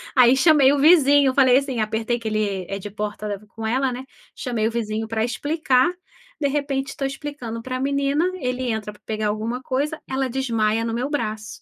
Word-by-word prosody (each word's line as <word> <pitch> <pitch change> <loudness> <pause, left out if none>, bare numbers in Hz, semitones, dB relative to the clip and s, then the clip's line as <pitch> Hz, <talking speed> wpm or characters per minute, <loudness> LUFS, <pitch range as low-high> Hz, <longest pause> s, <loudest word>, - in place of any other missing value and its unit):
Aí 250 -1 +6
chamei 280 -2 +6
o 285 - +1
vizinho, 285 -2 +6
eu - - -1
falei 260 -2 +5
assim 270 -4 -1
apertei 220 +2 -1
que 230 - -14
ele 205 -3 -1
é 195 - -3
de 205 +2 -7
porta 210 0 -4
com 225 +1 -5
ela, 260 +3 +1
né, 250 +2 -6 0.3
chamei 235 -4 -2
o - - -2
vizinho 220 -1 -3
para 220 0 0
explicar. 285 +3 +1 0.5
De 290 - +1
repente, 275 -1 -2
tô 280 - -4
explicando 270 -4 -5
pra 255 +2 -4
menina, 280 +3 +1
ele 250 -6 -3
entra 215 -1 -4
pra 210 - -21
pegar 215 -1 -2
alguma 220 +4 -2
coisa, 285 +4 -2
ela 265 0 -1
desmaia 230 -4 0
no 230 - -2
meu 250 +4 -2
braço. 215 -7 -4
250 Hz, 195 wpm, -22 LUFS, 220-275 Hz, 0.5 s, Aí